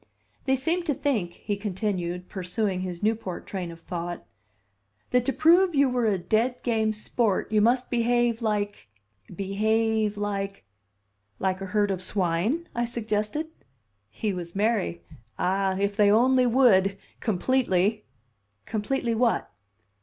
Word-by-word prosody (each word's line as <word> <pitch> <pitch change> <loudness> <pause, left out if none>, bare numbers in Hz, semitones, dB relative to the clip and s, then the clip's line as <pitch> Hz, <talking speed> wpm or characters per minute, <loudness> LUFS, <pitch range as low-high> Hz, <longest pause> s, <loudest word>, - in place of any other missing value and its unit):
"They 265 -1 +3
seemed 335 +6 -1
to 290 - +1
think," 220 - -1
he 205 - -3
continued, 185 -3 -3
pursuing 190 0 -2
his 180 0 -5
Newport 215 -4 -1
train 185 -3 -4
of 165 0 -10
thought, 175 0 -5 0.9
"that 250 -1 +3
to 270 - +2
prove 335 +5 +4
you 280 -1 +4
were 245 -2 +1
a 205 -3 +2
dead 225 +7 0
game 220 -2 +1
sport 215 -1 -1
you 215 -1 +4
must 245 +3 +2
behave 240 -1 +2
like 205 - -2 0.5
behave 215 +2 +1
like 200 -1 -3 0.4
" - - -49 0.3
"Like 190 0 -1
a 195 - -4
herd 205 +1 +1
of 185 -1 -2
swine," 195 - 0
I 240 - 0
suggested. 230 +5 -2 0.6
He 210 - -2
was 175 -1 -6
merry. 205 -4 0 0.3
"Ah, 190 +1 +1
if 200 +1 0
they 205 -1 +5
only 250 +4 +4
would 200 -6 +4 0.2
completely!" 215 -2 +1 0.6
"Completely 230 +2 -1
what?" 230 - +1
210 Hz, 140 wpm, -26 LUFS, 190-240 Hz, 0.9 s, they